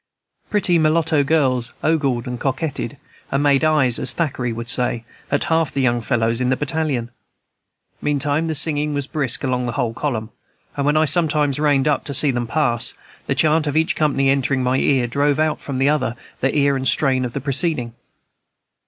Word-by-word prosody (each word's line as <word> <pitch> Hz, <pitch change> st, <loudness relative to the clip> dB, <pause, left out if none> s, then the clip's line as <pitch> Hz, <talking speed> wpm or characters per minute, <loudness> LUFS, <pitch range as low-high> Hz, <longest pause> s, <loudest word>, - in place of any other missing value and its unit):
Pretty 185 Hz, -5 st, +2 dB
mulatto 155 Hz, -1 st, +2 dB
girls 130 Hz, -6 st, 0 dB
ogled 140 Hz, -7 st, +1 dB
and 125 Hz, -1 st, -5 dB
coquetted, 140 Hz, +1 st, -3 dB, 0.3 s
and 135 Hz, +1 st, +1 dB
made 140 Hz, -1 st, +3 dB
eyes, 150 Hz, -6 st, +2 dB
as -, -, +1 dB
Thackeray 130 Hz, -7 st, -2 dB
would 115 Hz, +1 st, -6 dB
say, 125 Hz, -2 st, -1 dB, 0.3 s
at 145 Hz, -, 0 dB
half 160 Hz, -2 st, +1 dB
the -, -, -3 dB
young 120 Hz, -2 st, +1 dB
fellows 115 Hz, 0 st, 0 dB
in 125 Hz, -, +1 dB
the 130 Hz, -, +2 dB
battalion. 145 Hz, -5 st, -2 dB, 0.9 s
Meantime 145 Hz, +2 st, 0 dB
the 160 Hz, -, -1 dB
singing 150 Hz, 0 st, +1 dB
was 140 Hz, -1 st, -1 dB
brisk 140 Hz, -4 st, -1 dB
along 125 Hz, -2 st, -1 dB
the 120 Hz, -, -3 dB
whole 115 Hz, -2 st, -1 dB
column, 115 Hz, -5 st, -3 dB, 0.4 s
and 140 Hz, 0 st, -1 dB
when 150 Hz, +1 st, +3 dB
I 155 Hz, -, +4 dB
sometimes 150 Hz, -3 st, +1 dB
reined 145 Hz, -2 st, +2 dB
up 150 Hz, -, +1 dB
to 140 Hz, -, -3 dB
see 145 Hz, +1 st, +4 dB
them 120 Hz, -2 st, -3 dB
pass, 120 Hz, -4 st, -1 dB, 0.3 s
the -, -, 0 dB
chant 155 Hz, 0 st, +2 dB
of 145 Hz, +1 st, -1 dB
each 160 Hz, 0 st, +1 dB
company, 135 Hz, -3 st, +1 dB
entering 135 Hz, -1 st, 0 dB
my 125 Hz, +1 st, +1 dB
ear, 135 Hz, -2 st, +2 dB
drove 140 Hz, +4 st, +1 dB
out 155 Hz, 0 st, 0 dB
from 140 Hz, -2 st, -4 dB
the 135 Hz, +2 st, +2 dB
other 150 Hz, -6 st, 0 dB, 0.3 s
ear 140 Hz, +1 st, +2 dB
the 130 Hz, -, -4 dB
strain 130 Hz, -3 st, +3 dB
of 120 Hz, -2 st, -4 dB
the -, -, -3 dB
preceding. 135 Hz, -3 st, 0 dB
140 Hz, 190 wpm, -20 LUFS, 125-150 Hz, 0.9 s, I